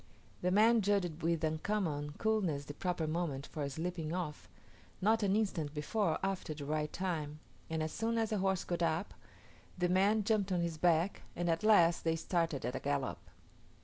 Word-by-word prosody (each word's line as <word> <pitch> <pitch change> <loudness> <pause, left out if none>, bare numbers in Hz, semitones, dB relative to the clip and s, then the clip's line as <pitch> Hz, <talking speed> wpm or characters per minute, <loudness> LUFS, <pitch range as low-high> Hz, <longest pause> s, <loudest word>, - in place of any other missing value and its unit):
The 180 - +1
man 220 +4 +5
judged 185 -5 0
with 165 0 0
uncommon 155 -2 -1
coolness 190 -10 0
the 145 - -7
proper 175 +1 -2
moment 155 -4 -2
for 145 -2 -4
slipping 165 +2 -3
off, 160 -5 -5 0.5
not 220 +4 +3
an 200 -1 +2
instant 165 -9 -1
before 200 +8 0
or - - -3
after 190 -5 -2
the 145 -1 -6
right 150 +1 -1
time; 160 -5 -3 0.3
and 160 -1 -1
as 155 - -3
soon 230 +1 -1
as 225 -1 0
the 210 - +1
horse 190 -1 +1
got 175 -1 -3
up, 170 +3 0 0.6
the 180 0 +1
man 200 +4 +3
jumped 200 -2 +1
on 180 -1 +1
his 170 -2 -2
back, 175 +2 +2
and 175 0 0
at 165 - 0
last 175 -6 +5
they 165 0 +2
started 165 -5 -1
at 125 - -2
a - - -2
gallop. 140 -2 -1
170 Hz, 185 wpm, -34 LUFS, 155-195 Hz, 0.6 s, man